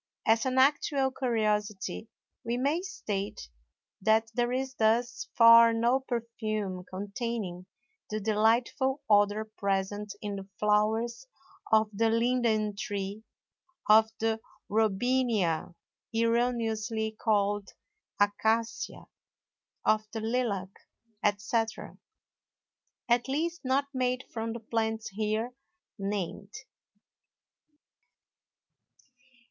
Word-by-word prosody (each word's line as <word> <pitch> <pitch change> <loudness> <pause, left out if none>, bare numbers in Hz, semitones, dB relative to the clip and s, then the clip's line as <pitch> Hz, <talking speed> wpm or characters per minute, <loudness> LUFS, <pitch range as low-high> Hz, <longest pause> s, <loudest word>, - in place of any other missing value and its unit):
As 225 +3 +3
an 260 0 -1
actual 275 0 +3
curiosity 215 -5 -1 0.3
we 235 +1 -1
may 285 +7 +1
state 205 - -5 0.5
that 220 +2 +3
there 240 +1 0
is 265 +1 -2
thus 235 +1 +1
far 230 0 +8
no 235 +3 +2
perfume 215 -6 -3
containing 200 -2 -4 0.4
the 215 -1 -2
delightful 230 +6 +1
odor 205 +1 +3
present 205 -1 -2
in 205 -1 -4
the 195 0 -8
flowers 220 +4 +1 0.4
of 220 0 +5
the 225 +3 +2
linden 230 -3 +1
tree, 200 0 -4 0.7
of 220 +1 +6
the 225 0 0 0.3
Robinia 215 -5 +1 0.4
(erroneously 230 -1 0
called 205 -2 +1 0.5
Acacia), 220 +8 0 0.8
of 215 0 +2
the 225 - -2
lilac, 220 -5 -1 0.5
etc., 215 +2 -1 1.1
at 240 +1 +2
least 330 +5 -2
not 270 +2 +1
made 255 0 0
from 225 0 -3
the 235 - -6
plants 220 0 -2
here 215 +4 -2 0.5
named. 200 0 -4
220 Hz, 90 wpm, -29 LUFS, 210-240 Hz, 1.1 s, far